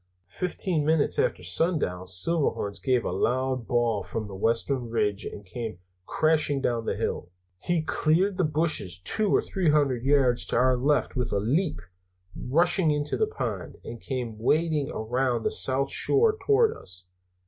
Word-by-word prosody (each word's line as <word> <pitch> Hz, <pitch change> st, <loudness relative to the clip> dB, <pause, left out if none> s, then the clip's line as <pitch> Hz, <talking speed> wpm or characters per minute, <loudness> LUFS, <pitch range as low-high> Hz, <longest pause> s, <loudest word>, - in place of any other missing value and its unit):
"Fifteen 175 Hz, -, -2 dB
minutes 160 Hz, -, +2 dB
after -, -, 0 dB
sundown 145 Hz, -, -1 dB
Silverhorns 100 Hz, -, 0 dB
gave 125 Hz, -3 st, +1 dB
a -, -, -2 dB
loud 130 Hz, -1 st, -1 dB
bawl 120 Hz, -4 st, +1 dB
from 110 Hz, -1 st, -5 dB
the 100 Hz, -, -10 dB
western 115 Hz, +5 st, 0 dB
ridge 105 Hz, -2 st, -1 dB
and 100 Hz, -, -8 dB
came 110 Hz, +1 st, -6 dB, 0.3 s
crashing 155 Hz, -3 st, +1 dB
down 120 Hz, -3 st, -1 dB
the -, -, -1 dB
hill. 90 Hz, -, -3 dB, 0.3 s
He 170 Hz, -, -1 dB
cleared 175 Hz, +5 st, +1 dB
the 185 Hz, -, +1 dB
bushes 150 Hz, -, +1 dB
two 205 Hz, -, -1 dB
or -, -, +2 dB
three 185 Hz, -4 st, -1 dB
hundred 140 Hz, -5 st, +2 dB
yards 135 Hz, -3 st, +3 dB
to -, -, -2 dB
our 130 Hz, 0 st, +3 dB
left 135 Hz, 0 st, 0 dB
with 125 Hz, -2 st, -2 dB
a 100 Hz, -, +1 dB
leap, 140 Hz, -, -1 dB, 0.5 s
rushed 170 Hz, +8 st, +2 dB
into 150 Hz, -4 st, +1 dB
the 435 Hz, -, +1 dB
pond, 435 Hz, -, -5 dB
and 115 Hz, 0 st, -9 dB
came 120 Hz, -5 st, -5 dB
wading 155 Hz, +3 st, +1 dB
around 120 Hz, +1 st, -1 dB
the -, -, 0 dB
south 135 Hz, +1 st, +2 dB
shore 435 Hz, +1 st, +3 dB
toward 430 Hz, +2 st, +2 dB
us. 90 Hz, -1 st, -10 dB
135 Hz, 160 wpm, -26 LUFS, 115-160 Hz, 0.5 s, yards